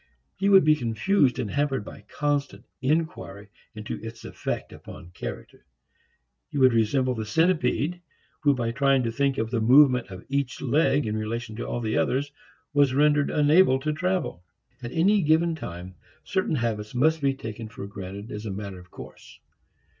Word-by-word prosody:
He 195 Hz, +1 st, 0 dB
would 195 Hz, -1 st, +7 dB
be 155 Hz, 0 st, +5 dB
confused 130 Hz, -, +1 dB
and 105 Hz, -, -3 dB
hampered 140 Hz, -6 st, -1 dB
by -, -, -10 dB
constant 140 Hz, -7 st, -2 dB, 0.2 s
inquiry 130 Hz, -, -2 dB, 0.3 s
into 105 Hz, 0 st, -6 dB
its 115 Hz, 0 st, -9 dB
effect -, -, -5 dB
upon 85 Hz, -, -12 dB
character. -, -, -8 dB, 0.9 s
He -, -, -5 dB
would 130 Hz, -2 st, +5 dB
resemble 125 Hz, +3 st, +2 dB
the 110 Hz, -2 st, -4 dB
centipede 165 Hz, -, +1 dB, 0.4 s
who 145 Hz, -2 st, +3 dB
by 115 Hz, -2 st, -1 dB
trying 135 Hz, +1 st, +2 dB
to 115 Hz, -, -1 dB
think 140 Hz, +2 st, 0 dB
of 110 Hz, +1 st, -2 dB
the 115 Hz, -2 st, 0 dB
movement 125 Hz, 0 st, +5 dB
of 95 Hz, -2 st, -10 dB
each 140 Hz, -2 st, -2 dB
leg 145 Hz, +1 st, +2 dB
in 110 Hz, 0 st, -2 dB
relation 110 Hz, +1 st, -4 dB
to 120 Hz, -, -4 dB
all 120 Hz, -, -3 dB
the 110 Hz, -1 st, -1 dB
others 140 Hz, +3 st, 0 dB, 0.4 s
was 140 Hz, -3 st, +3 dB
rendered 145 Hz, 0 st, +3 dB
unable 150 Hz, -1 st, +4 dB
to 150 Hz, +3 st, -2 dB
travel. 180 Hz, -, -2 dB, 0.4 s
At 120 Hz, -1 st, -6 dB
any 200 Hz, +5 st, +3 dB
given 165 Hz, +1 st, +3 dB
time, 90 Hz, -, -7 dB, 0.3 s
certain 190 Hz, -5 st, -1 dB
habits 110 Hz, -3 st, -3 dB
must 155 Hz, +5 st, +2 dB
be 135 Hz, -1 st, +1 dB
taken 110 Hz, -2 st, -7 dB
for 100 Hz, -, -8 dB
granted 100 Hz, +2 st, -8 dB
as 105 Hz, +1 st, -6 dB
a -, -, -3 dB
matter 100 Hz, -1 st, -6 dB
of 90 Hz, 0 st, -16 dB
course. -, -, -13 dB
130 Hz, 170 wpm, -25 LUFS, 110-150 Hz, 0.9 s, would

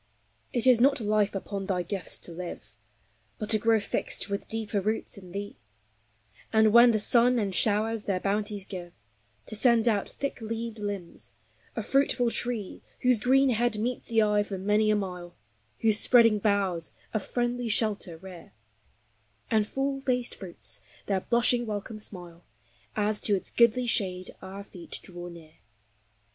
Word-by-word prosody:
It 240 Hz, 0 st, +1 dB
is 250 Hz, -3 st, +6 dB
not 275 Hz, +1 st, +4 dB
life 210 Hz, -2 st, +1 dB
upon 195 Hz, 0 st, -4 dB
thy 180 Hz, -2 st, 0 dB
gifts 190 Hz, +1 st, -4 dB
to -, -, -6 dB
live, 175 Hz, +1 st, -8 dB, 0.6 s
But 215 Hz, -1 st, -3 dB
to 215 Hz, -, +5 dB
grow 225 Hz, +1 st, +3 dB
fixed 200 Hz, -, -2 dB
with 200 Hz, -, -3 dB
deeper 220 Hz, -2 st, -2 dB
roots 215 Hz, +3 st, -2 dB
in 185 Hz, -3 st, -12 dB
Thee; 200 Hz, +2 st, -6 dB, 0.9 s
And 220 Hz, -1 st, +4 dB
when 240 Hz, +1 st, +9 dB
the 220 Hz, -2 st, +2 dB
sun 240 Hz, +3 st, +4 dB
and 200 Hz, -4 st, -1 dB
showers 215 Hz, +2 st, +1 dB
their 190 Hz, -2 st, 0 dB
bounties 205 Hz, 0 st, -2 dB
give, 175 Hz, -3 st, -8 dB, 0.5 s
To -, -, -5 dB
send 235 Hz, +1 st, +4 dB
out 210 Hz, -4 st, +1 dB
thick 280 Hz, -3 st, -5 dB
leaved 225 Hz, 0 st, -4 dB
limbs; 200 Hz, -4 st, -5 dB, 0.4 s
a 225 Hz, -, -2 dB
fruitful 250 Hz, -1 st, +2 dB
tree 230 Hz, -6 st, -3 dB, 0.2 s
Whose 250 Hz, -3 st, +4 dB
green 265 Hz, +3 st, +4 dB
head 235 Hz, -1 st, +1 dB
meets 240 Hz, +4 st, -2 dB
the 225 Hz, -1 st, +3 dB
eye 210 Hz, 0 st, +3 dB
for 205 Hz, -1 st, -4 dB
many 210 Hz, +3 st, +2 dB
a 215 Hz, -, +4 dB
mile, 180 Hz, -3 st, -5 dB, 0.5 s
Whose 220 Hz, -1 st, +3 dB
spreading 230 Hz, -4 st, +5 dB
boughs 195 Hz, -5 st, 0 dB, 0.2 s
a 215 Hz, -, +1 dB
friendly 240 Hz, +2 st, -2 dB
shelter 210 Hz, -6 st, 0 dB
rear, 175 Hz, -, -12 dB, 1.0 s
And 215 Hz, -1 st, +3 dB
full 270 Hz, +2 st, -2 dB
faced 250 Hz, -2 st, 0 dB
fruits 170 Hz, -, -5 dB, 0.2 s
their 195 Hz, -2 st, 0 dB
blushing 240 Hz, +1 st, +2 dB
welcome 215 Hz, +1 st, -5 dB
smile 175 Hz, -4 st, -7 dB, 0.5 s
As 210 Hz, 0 st, +1 dB
to 205 Hz, -, +3 dB
its 190 Hz, -, -4 dB
goodly 240 Hz, +1 st, +4 dB
shade 185 Hz, -6 st, 0 dB
our 195 Hz, +1 st, -8 dB
feet 180 Hz, -4 st, -8 dB
draw 175 Hz, -1 st, -8 dB
near. 165 Hz, -2 st, -13 dB
210 Hz, 160 wpm, -28 LUFS, 195-235 Hz, 1.0 s, when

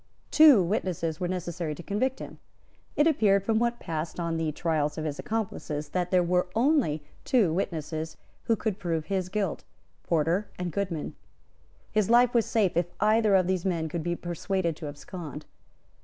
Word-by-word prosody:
Two 295 Hz, -, +8 dB
witnesses 170 Hz, -4 st, -2 dB
were 180 Hz, -, -1 dB
necessary 175 Hz, -3 st, -3 dB
to 175 Hz, -, -10 dB
convict 255 Hz, +8 st, -1 dB
him. -, -, -9 dB, 0.6 s
It 295 Hz, -, +4 dB
appeared 210 Hz, -11 st, +3 dB
from 220 Hz, +1 st, +1 dB
what 235 Hz, 0 st, +2 dB
had 240 Hz, -, -26 dB
passed 160 Hz, +1 st, -4 dB
on 170 Hz, -1 st, -1 dB
the 160 Hz, -1 st, -1 dB
trials 150 Hz, -1 st, -1 dB
of 155 Hz, -, -3 dB
his 150 Hz, -2 st, -3 dB
accomplices, 170 Hz, -9 st, -3 dB
that 180 Hz, -1 st, -1 dB
there 180 Hz, -1 st, +3 dB
were 180 Hz, +1 st, +1 dB
only 230 Hz, -, +2 dB, 0.2 s
two 210 Hz, -11 st, +3 dB
witnesses 160 Hz, -3 st, -3 dB, 0.3 s
who 230 Hz, -, +3 dB
could 215 Hz, -3 st, -3 dB
prove 165 Hz, -4 st, -2 dB
his 185 Hz, +1 st, -2 dB
guilt, 195 Hz, -2 st, -2 dB, 0.4 s
Porter 170 Hz, +5 st, +1 dB
and 180 Hz, -1 st, -3 dB
Goodman. 180 Hz, -4 st, -3 dB, 0.8 s
His 215 Hz, -2 st, +1 dB
life 240 Hz, +1 st, +5 dB
was 235 Hz, -2 st, +3 dB
safe 210 Hz, -6 st, +1 dB
if 175 Hz, 0 st, +2 dB
either 215 Hz, 0 st, +4 dB
of 185 Hz, -2 st, +4 dB
these 185 Hz, -1 st, 0 dB
men 170 Hz, -4 st, 0 dB
could 170 Hz, +2 st, -3 dB
be 175 Hz, +2 st, -1 dB
persuaded 175 Hz, 0 st, -2 dB
to 155 Hz, -, -6 dB
abscond. 150 Hz, 0 st, -8 dB
180 Hz, 175 wpm, -27 LUFS, 160-210 Hz, 0.8 s, Two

